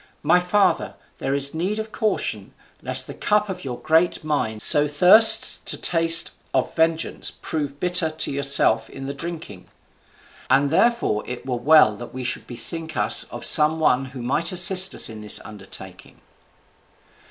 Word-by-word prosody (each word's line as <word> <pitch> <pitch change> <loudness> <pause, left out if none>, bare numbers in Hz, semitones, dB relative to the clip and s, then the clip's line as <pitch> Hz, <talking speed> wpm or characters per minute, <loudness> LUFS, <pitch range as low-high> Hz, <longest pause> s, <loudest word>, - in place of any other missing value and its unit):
My 180 - +3
father, 190 +3 0 0.2
there 135 - -2
is 140 0 +1
need 185 +6 -3
of 220 0 -6
caution, 215 -1 -4 0.3
lest - - +1
the - - -9
cup 210 0 -1
which 185 -1 -7
your 125 -3 -6
great 165 +2 0
mind 110 -8 -3
so 145 0 +3
thirsts 180 +10 +5
to - - +1
taste 165 -1 +3 0.2
of 130 - -2
vengeance 165 0 -1
prove 145 -2 -6
bitter 180 -2 +1
to 155 0 -3
yourself 140 -5 +1
in 135 - -10
the 140 - -5
drinking. 160 - -8 0.8
And 140 +1 +2
therefore 230 - +1
it 125 0 -8
were 130 -2 -3
well 135 -4 +4
that 120 +2 -11
we 130 - -6
should 130 - -3
bethink 160 +5 -7
us 105 - +2
of - - -7
some 155 +1 +4
one 135 -4 +1
who 130 -2 -10
might 150 +7 -1
assist 185 +1 +5
us - - +3
in 110 -2 -10
this 105 - +1
undertaking." 95 -3 -12
155 Hz, 165 wpm, -21 LUFS, 130-175 Hz, 0.8 s, thirsts